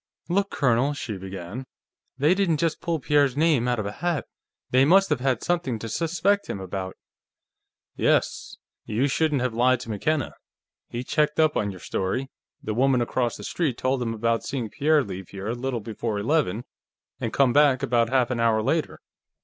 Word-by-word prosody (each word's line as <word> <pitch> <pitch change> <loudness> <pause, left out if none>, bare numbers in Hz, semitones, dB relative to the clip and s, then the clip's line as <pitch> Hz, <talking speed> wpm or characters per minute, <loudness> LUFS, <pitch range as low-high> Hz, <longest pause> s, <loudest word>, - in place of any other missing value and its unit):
"Look, 200 +3 +1
Colonel," 135 +2 +1
she 115 -6 -5
began. 95 +6 -7 0.5
"They 150 +6 +4
didn't 185 -5 +1
just 165 +1 -1
pull 165 -2 -1
Pierre's 140 -1 +2
name 150 -6 +3
out 125 -1 +1
of 110 - -2
a 100 - -3
hat. 170 +5 -2 0.5
They 130 +1 +5
must 195 +7 +5
have - - +2
had 130 -2 0
something 170 -9 0
to 115 - -6
suspect 180 - 0
him 100 - -3
about." 95 0 -5 1.0
"Yes. - - 0 0.3
You 115 +6 0
shouldn't 145 -2 +1
have 125 -2 -1
lied 125 +2 +3
to 115 - -6
McKenna. 145 +7 -1 0.6
He 120 +1 -4
checked 150 +4 0
up 155 -1 +4
on 100 - 0
your 95 -2 -8
story; 130 +11 -2 0.3
the 110 - -2
woman 130 +2 +3
across 120 0 -1
the 105 - -9
street 145 - -1
told 130 0 0
him 115 -2 -2
about 115 +1 0
seeing 125 -7 -4
Pierre 150 0 +3
leave 95 -4 -7
here 100 +2 -6
a - - 0
little 125 -1 -3
before 110 0 -3
eleven 115 - 0 0.6
and - - -2
come 135 -3 +3
back 145 -3 +4
about 115 -1 +2
half 130 -1 +2
an 120 - -1
hour 115 -2 +2
later." 155 +6 -1
125 Hz, 185 wpm, -25 LUFS, 115-150 Hz, 1.0 s, They